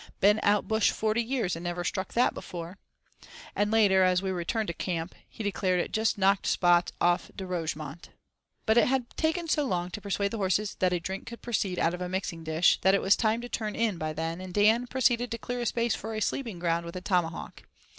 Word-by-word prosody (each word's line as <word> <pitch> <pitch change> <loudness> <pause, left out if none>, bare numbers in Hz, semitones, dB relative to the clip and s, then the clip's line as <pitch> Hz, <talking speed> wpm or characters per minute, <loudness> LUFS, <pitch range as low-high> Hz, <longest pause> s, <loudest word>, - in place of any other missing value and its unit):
"Been 205 +2 +5
out 205 0 +2
bush 220 -1 +3
forty 220 +1 0
years 235 -7 -1
and 165 - -7
never 175 0 -3
struck 190 +3 -3
that 245 - +3
before"; 175 +2 -8 0.8
and 205 0 +1
later, 205 -4 +4
as 180 -1 +3
we 190 0 -2
returned 185 +5 -1
to 170 - -3
camp, 170 -1 -3 0.2
he 225 - -7
declared 190 -3 0
it - - -2
"just 220 0 +1
knocked 195 0 +2
spots 175 -1 +3
off 175 0 +2
De 190 - -5
Rougemont." 160 -3 -4 0.6
But 220 +2 +5
it - - +4
had 255 -2 0
taken 330 +1 0
so 300 -1 +2
long 180 -8 -2
to 210 - -6
persuade 200 0 -1
the 230 - -3
horses 200 +2 0
that 185 -1 +2
a 180 - +1
drink 190 +3 -6
could 235 - -9
proceed 200 -6 -1
out 165 - +2
of 180 - -5
a 180 - -3
mixing 180 -3 -3
dish, 160 +2 +3
that 190 +1 +5
it - - +1
was 195 - +5
time 220 +1 +1
to 245 - -6
turn 215 -3 -3
in 220 -6 0
by 155 0 -2
then; 165 +3 -4
and 185 -1 -8
Dan 220 +4 +4
proceeded 245 -1 +1
to 230 - -3
clear 245 +1 -4
a 240 - -1
space 235 0 +1
for 220 +1 -5
a - - -1
sleeping 225 -2 -2
ground 170 -1 0
with 170 +1 -8
a 180 - -4
tomahawk. 180 -4 -2
195 Hz, 230 wpm, -28 LUFS, 175-225 Hz, 0.8 s, Been